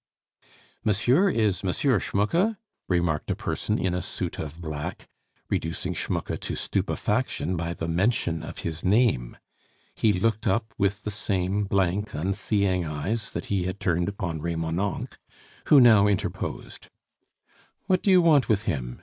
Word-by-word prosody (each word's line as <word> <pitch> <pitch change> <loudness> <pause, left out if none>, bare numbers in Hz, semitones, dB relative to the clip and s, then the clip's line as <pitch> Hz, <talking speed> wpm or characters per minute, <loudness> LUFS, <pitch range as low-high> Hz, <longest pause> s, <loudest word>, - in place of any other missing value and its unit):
"Monsieur 125 - +3
is 105 - +1
M. 95 - 0 0.3
Schmucke?" 170 - +1 0.3
remarked 85 -4 0
a - - +1
person 105 - -2
in 90 -1 0
a 90 - -1
suit - - -4
of 80 +1 -6
black, 75 -3 -5 0.4
reducing 80 0 -2
Schmucke - - -3
to - - -4
stupefaction 90 +5 -1
by 85 0 -3
the 80 - -4
mention 85 -2 +1
of 80 - -8
his 80 -1 -3
name. 100 - +2 0.6
He 110 - +2
looked 110 +3 0
up 110 +3 0
with 100 +1 0
the 105 - -3
same 100 -1 -1
blank, 100 +1 0
unseeing 95 +2 0
eyes 90 +9 -3
that - - -4
he 95 -3 +1
had 90 +2 -4
turned 85 +1 +1
upon 90 -6 -4
Remonencq, 85 +3 -2 0.5
who 145 - +8
now 110 -5 +7
interposed. 100 -2 -3 1.0
"What 185 -2 +2
do - - +1
you 185 -2 +6
want 150 -6 +4
with 105 -2 +2
him?" 60 - -3
95 Hz, 145 wpm, -26 LUFS, 85-110 Hz, 1.0 s, who